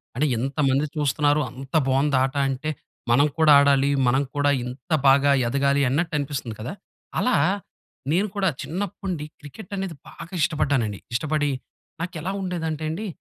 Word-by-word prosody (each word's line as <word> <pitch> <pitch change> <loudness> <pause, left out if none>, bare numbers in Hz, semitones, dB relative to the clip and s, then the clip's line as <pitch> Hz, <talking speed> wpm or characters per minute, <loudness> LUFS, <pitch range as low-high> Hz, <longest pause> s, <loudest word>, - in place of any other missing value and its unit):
అంటే 145 - +1
ఎంతమంది 135 +2 +1
చూస్తున్నారు 145 0 +2
అంత 135 +3 -9
బావుందాట 135 0 +2
అంటే, 135 +4 -3 0.4
మనం 140 +5 +5
కూడా 160 -2 +5
ఆడాలి, 140 0 +4 0.2
మనం 135 +3 +3
కూడా 145 0 +3
ఇంత 125 +6 -9 0.2
బాగా 140 +1 +5 0.2
ఎదగాలి 140 +2 +2
అన్నట్టు 160 +5 0
అనిపిస్తుంది 135 -5 -4
కదా! 120 - -4 0.5
అలా 250 - +2 0.8
నేను 190 +6 +2
కూడా 195 -2 +2
చిన్నప్పటి 185 +3 -4
నుండి 170 -6 -2
క్రికెట్ 155 +9 -11
అనేది 190 -4 -3
బాగా 170 - -11
ఇష్టపడ్డానండి. 135 - +1
ఇష్టపడి 145 +3 0 0.5
నాకెలా 175 +1 -4
ఉండేదంటే 160 -4 -3
అండి, 205 +7 -4
145 Hz, 135 wpm, -24 LUFS, 135-160 Hz, 0.8 s, మనం